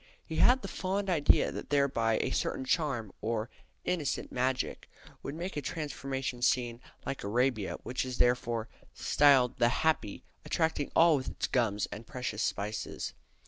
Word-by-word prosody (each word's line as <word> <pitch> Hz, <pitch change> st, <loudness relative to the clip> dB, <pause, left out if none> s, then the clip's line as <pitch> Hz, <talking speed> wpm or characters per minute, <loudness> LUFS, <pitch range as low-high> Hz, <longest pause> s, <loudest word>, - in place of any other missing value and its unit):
He -, -, -5 dB
had 255 Hz, -1 st, +5 dB
the -, -, -3 dB
fond 195 Hz, +1 st, -2 dB
idea 155 Hz, -5 st, +4 dB
that -, -, -7 dB
thereby 130 Hz, -6 st, +2 dB
a -, -, -1 dB
certain 130 Hz, -, -1 dB
charm, 130 Hz, -, 0 dB
"or 115 Hz, +1 st, -2 dB, 0.3 s
innocent 165 Hz, -6 st, -1 dB
magick," 130 Hz, +1 st, -1 dB, 0.3 s
would 140 Hz, -, -5 dB
make 175 Hz, +4 st, -4 dB
a 145 Hz, -, -1 dB
transformation 135 Hz, -3 st, -4 dB
scene 120 Hz, -1 st, +1 dB, 0.2 s
like 135 Hz, -, -4 dB
Arabia, 115 Hz, 0 st, +1 dB
which 125 Hz, -, -2 dB
is 130 Hz, -1 st, -5 dB
therefore 120 Hz, -2 st, +1 dB, 0.3 s
"styl'd 135 Hz, -5 st, +4 dB
the 120 Hz, 0 st, +5 dB
Happy, 155 Hz, -8 st, 0 dB, 0.2 s
attracting 160 Hz, -3 st, 0 dB
all 165 Hz, -2 st, +6 dB
with 130 Hz, -, -4 dB
its -, -, -3 dB
gums 110 Hz, -5 st, +1 dB
and 110 Hz, +2 st, -8 dB
precious 125 Hz, -4 st, -3 dB
spices." 105 Hz, 0 st, -3 dB
130 Hz, 150 wpm, -31 LUFS, 115-150 Hz, 0.3 s, all